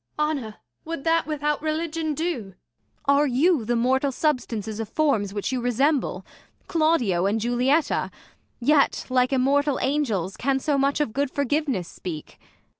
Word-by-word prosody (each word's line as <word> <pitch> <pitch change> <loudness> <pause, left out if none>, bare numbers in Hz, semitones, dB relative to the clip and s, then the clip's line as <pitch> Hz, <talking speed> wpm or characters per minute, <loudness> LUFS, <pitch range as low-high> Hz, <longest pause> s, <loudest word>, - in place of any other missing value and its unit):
Jul. 300 - +2
Honour, 240 -9 -4 0.3
would 325 -3 -5
that 330 -1 +2
without 300 -1 -1
religion 315 0 -2
do 260 - -3 0.2
] - - -37
Ang. 280 - +5
Are 295 - +3
you 275 +1 +2
the 240 +2 0
mortal 260 +4 +2
substances 230 -7 -2
of 220 -2 -4
forms 225 -9 +1
Which 205 +4 -3
you 255 -1 -1
resemble, 265 +4 0 0.4
Claudio 275 - +2
and 210 +3 +1
Julietta; 250 +7 +1 0.5
Yet, 280 +3 +2
like 255 0 +2
immortal 275 +2 +2
angels, 225 - -1
can 270 +1 +1
so 280 +1 0
much 280 +2 +1
Of 235 -7 -1
good 280 +1 0
forgiveness 280 - -1
speak 160 -4 -8
275 Hz, 155 wpm, -24 LUFS, 235-300 Hz, 0.5 s, Ang